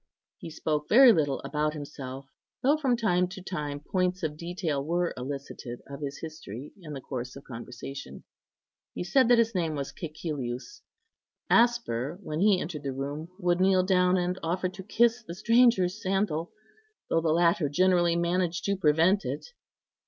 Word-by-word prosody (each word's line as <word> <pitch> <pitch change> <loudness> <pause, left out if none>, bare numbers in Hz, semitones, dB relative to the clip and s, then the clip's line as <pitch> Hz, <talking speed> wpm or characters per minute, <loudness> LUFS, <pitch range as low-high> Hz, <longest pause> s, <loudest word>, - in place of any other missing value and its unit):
He - - -7
spoke 150 -1 -2
very 245 +1 +8
little 145 -6 0
about 150 0 -1
himself, 135 -2 -7 0.4
though 280 +4 +5
from 270 -6 +1
time 180 -6 +2
to 185 +1 -9
time 150 -6 -4
points 180 +4 -1
of 150 -2 -1
detail 170 -3 -3
were 175 +3 0
elicited 130 -2 -6
of 140 +1 -8
his 140 -1 -5
history 150 -5 -8
in 155 -3 -8
the 135 - -6
course 125 -1 -6
of 140 - -10
conversation. 125 +3 -8 0.7
He - - -3
said 255 +8 +3
that 245 0 +6
his 230 0 +2
name 165 -5 -1
was 140 -1 -4
Cæcilius. 150 - -5 0.7
Asper, 230 - +2
when 155 -2 -4
he 200 -1 +4
entered 155 -3 -5
the 135 -2 -3
room, 145 +5 -5
would 175 -2 +1
kneel 190 -1 +4
down 180 -1 +3
and 180 +1 -1
offer 180 +3 -1
to 190 +1 -9
kiss 235 +4 +2
the 170 -6 -8
stranger's 225 -3 +3
sandal, 190 -5 -1 0.6
though 165 - +2
the 165 - 0
latter 170 -2 +3
generally 175 +2 +3
managed 175 0 0
to 200 - +1
prevent 180 +3 +3
it. - - -5
170 Hz, 165 wpm, -28 LUFS, 145-190 Hz, 0.7 s, very